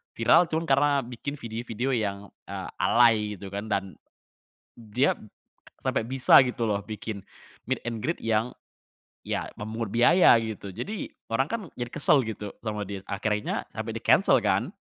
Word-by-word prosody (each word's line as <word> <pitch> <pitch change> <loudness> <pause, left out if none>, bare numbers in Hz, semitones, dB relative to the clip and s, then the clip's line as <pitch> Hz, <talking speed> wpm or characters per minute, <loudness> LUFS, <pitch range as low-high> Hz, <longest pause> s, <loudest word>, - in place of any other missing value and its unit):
viral 175 - +5
cuman 160 +1 -2
karena 140 +2 +4
bikin 125 +4 -6
video-video 115 +2 -4
yang, 100 -3 -1 0.3
eee, - - -6
alay 115 -2 +5 0.2
gitu 100 +1 -9
kan 100 +2 -4
dan, 95 -2 -2 0.8
d 115 +3 -4
dia - - +5 0.7
sampai 110 - 0
bisa 130 0 +6
gitu 120 -1 -2
loh 100 0 0
bikin, 110 -1 -6 0.5
meet - - -1
and 115 -2 -3
greet 165 +4 -1
yang, 115 +2 0 0.7
ya - - -2
memungut 110 0 -4
biaya 165 +10 +6
gitu. 110 -3 -6
Jadi 210 - -5 0.2
orang 135 +5 +1
kan 230 -1 -2 0.2
jadi 120 0 -4
kesel 140 -3 +3
gitu 105 -2 -6
sama 105 -2 -3
dia 100 -1 -6
akhirnya 105 +1 -2
sampai - - -4
di - - -4
cancel - - +5
kan. - - 0
115 Hz, 160 wpm, -27 LUFS, 105-125 Hz, 0.8 s, bisa